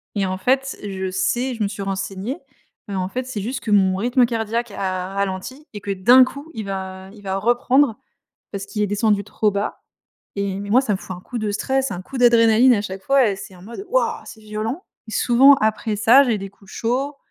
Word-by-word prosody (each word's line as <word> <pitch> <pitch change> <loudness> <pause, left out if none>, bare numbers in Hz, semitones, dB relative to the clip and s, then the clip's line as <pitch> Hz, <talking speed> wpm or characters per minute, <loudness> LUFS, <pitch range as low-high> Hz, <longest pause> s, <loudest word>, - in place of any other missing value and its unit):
et 200 - +1
en 185 0 -3
fait, 265 +6 0
je 190 -2 -4
sais, 240 +7 0
je 225 - -2
me - - +1
suis 200 0 -6
renseignée, 195 - -3 0.5
heu, 195 - -3
en 185 0 -1
fait 255 +4 -3
c'est 250 -5 -5
juste 245 +7 -3
que 215 - -4
mon 190 -2 +4
rythme 245 +4 +3
cardiaque 230 0 -2
a 185 0 -3
ralenti 200 - -4
et 205 - -7
que 200 - -4
d'un 240 +7 +6
coup 280 +5 -6
il 215 -2 -5
va 190 -1 -6
il 205 -2 -15
va 190 0 -2
reprendre, 245 +3 +2 0.5
parce 200 -1 -5
qu'il 210 - -3
est - - +2
descendu 205 0 +1
trop 210 0 0
bas 200 +1 -3 0.6
et 200 -1 -2
mais 205 - -6
moi 250 - +6
ça 215 - -1
me 185 - -3
fout 185 - -8
un 180 - -11
coup 240 +5 -6
de 215 -1 -2
stress, 265 +4 0
un 180 +1 -6
coup 265 +5 -8
d'adrénaline 235 +1 +5
à 205 - -1
chaque 190 -1 -6
fois 270 -1 +3
et 195 - -3
c'est 190 -1 -10
en 175 - -15
mode: 235 - -8
«Waouh!». - - +1
C'est 220 - -11
violent, 215 - -4 0.2
et 220 - -8
souvent 265 +4 +6
après 215 -1 -1
ça 230 +7 +6
j'ai 235 -4 +1
des 195 0 -7
coups 195 0 -20
chauds, 265 +5 -2
215 Hz, 230 wpm, -21 LUFS, 195-250 Hz, 0.6 s, d'un